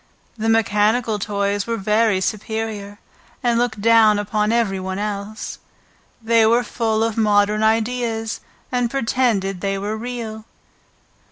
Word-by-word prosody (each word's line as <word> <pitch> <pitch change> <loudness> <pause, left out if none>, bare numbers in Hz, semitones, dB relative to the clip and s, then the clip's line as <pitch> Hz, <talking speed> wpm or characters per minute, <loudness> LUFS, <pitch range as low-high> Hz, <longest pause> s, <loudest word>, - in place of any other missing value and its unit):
The 225 0 -1
mechanical 220 0 +2
toys 200 0 -1
were 230 0 -1
very 210 -1 +2
superior, 215 0 -3 0.5
and 235 -1 +2
looked 230 -4 -1
down 225 -1 +5
upon 210 +1 0
every 225 -5 +1
one 190 0 -4
else; 210 +1 -5 0.6
they 230 0 +4
were 230 +3 +4
full 225 -2 -1
of 225 -1 -1
modern 210 -1 +3
ideas, 225 0 0 0.3
and 245 -2 0
pretended 225 -7 0
they 195 0 -1
were 205 +2 -3
real. 220 -2 -6
220 Hz, 125 wpm, -20 LUFS, 205-230 Hz, 0.6 s, down